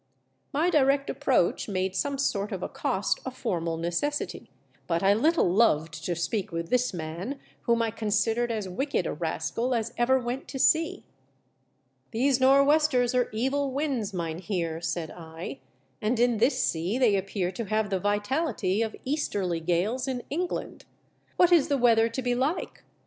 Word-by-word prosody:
My 320 +5 +1
direct 275 -2 +3
approach - - +1
made 190 -1 -1
some 280 +4 -1
sort 210 -7 -1
of 190 -3 -4
accost 190 +2 -1
a - - -3
formal 170 -10 -2
necessity, 175 - -2 0.4
but 170 0 0
1 200 +3 +4
little 325 - +3
loved 160 -6 +2
to 175 - -1
speak 180 +4 -2
with 165 0 -4
this 250 0 +2
man, 175 - -5 0.3
whom 235 0 +3
I 225 - -1
considered 225 +2 0
as 215 -4 -3
wicked 190 - -1
a - - -2
rascal 170 +10 -2
as 230 0 -2
ever 245 +3 +3
went 250 +2 -4
to 270 - -6
sea. 320 +4 +2 0.6
" 130 0 -44
These 260 +3 +2
nor' 270 +1 +6
westers 285 -4 +3
are 250 -1 +2
evil 265 +5 0
winds, 265 -7 -1
mynheer," 170 -1 -3
said 165 -2 -3
I, 160 -4 -8 0.4
"and 225 +3 0
in 240 -1 +3
this 245 +6 +2
sea 175 +8 0
they 240 -6 +4
appear 190 -1 -1
to 230 +3 -5
have 215 0 -1
the 190 - +1
vitality 205 - 0
of 220 -1 -2
easterly 200 - -1
gales 185 +10 0
in 250 -2 -3
England. 350 +4 -3 0.5
What 355 0 +5
is 335 -5 +5
the 285 -2 +1
weather 230 -2 +4
to 230 +3 -4
be 245 0 +1
like 270 +8 -2
225 Hz, 165 wpm, -27 LUFS, 180-265 Hz, 0.6 s, nor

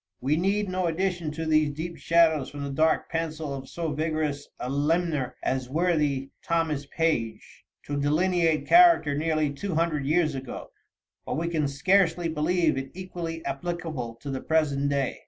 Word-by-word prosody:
We 135 +4 +1
need 195 +5 +1
no 185 -1 -1
addition 175 -1 -1
to 160 +1 -4
these 155 -1 +3
deep 170 +2 -5
shadows 160 -4 +3
from 145 0 -7
the 140 - -4
dark 155 +3 +2
pencil 160 -3 -3
of 135 -1 -7
so 165 -2 -3
vigorous 155 -1 -2
a 125 - -4
limner 150 0 0
as 130 -1 -1
worthy 150 -4 0
Thomas 160 -4 -1
Page, 120 -10 -2 0.2
to 145 -1 -3
delineate 165 +2 +2
character 340 - +6
nearly 155 -1 0
two 175 +5 -4
hundred 155 -4 0
years 155 0 +2
ago, 135 -2 -7 0.5
but - - -3
we 170 +1 -1
can 155 -4 0
scarcely 175 +4 +2
believe 160 -1 +1
it 135 0 -6
equally 175 -3 -6
applicable 140 -4 -4
to 140 - -5
the 130 - -3
present 145 -3 +1
day. 140 -2 -1
155 Hz, 160 wpm, -26 LUFS, 140-170 Hz, 0.5 s, character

